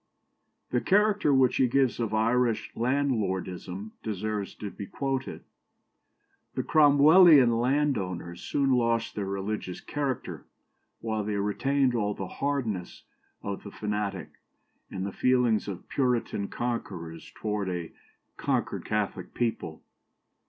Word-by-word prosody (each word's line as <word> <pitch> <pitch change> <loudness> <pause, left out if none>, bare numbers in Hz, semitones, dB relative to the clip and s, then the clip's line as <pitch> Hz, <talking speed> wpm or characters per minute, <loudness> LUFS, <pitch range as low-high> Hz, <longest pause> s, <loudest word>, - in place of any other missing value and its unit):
" - - -48
The 125 - +1
character 205 -5 +3
which 130 -2 +4
he 130 - +4
gives 130 0 +2
of 115 -3 -1
Irish 115 +1 +1
landlordism 105 -7 -1
deserves 105 -1 -3
to 105 -2 -6
be 100 - -8
quoted: 135 -1 -3 1.1
"The - - -1
Cromwellian 145 -4 +6
landowners 105 - -1
soon 140 -1 0
lost 115 -2 +1
their 100 -2 -3
religious 100 -1 -3
character, 140 -3 -4 0.6
while 110 -2 -2
they 105 0 -2
retained 130 +6 +1
all 105 -3 0
the 95 - -4
hardness 120 -11 -3 0.4
of 100 -1 -4
the 100 - -9
fanatic 105 -2 -3 0.6
and 95 0 -4
the 100 - -3
feelings 125 -2 +2
of 95 -3 -6
Puritan 125 -6 0
conquerors 85 -9 -5
towards 105 -3 -2
a 85 -3 -4 0.5
conquered - - -1
Catholic - - -2
people. 110 -9 -2
115 Hz, 120 wpm, -28 LUFS, 100-130 Hz, 1.1 s, Cromwellian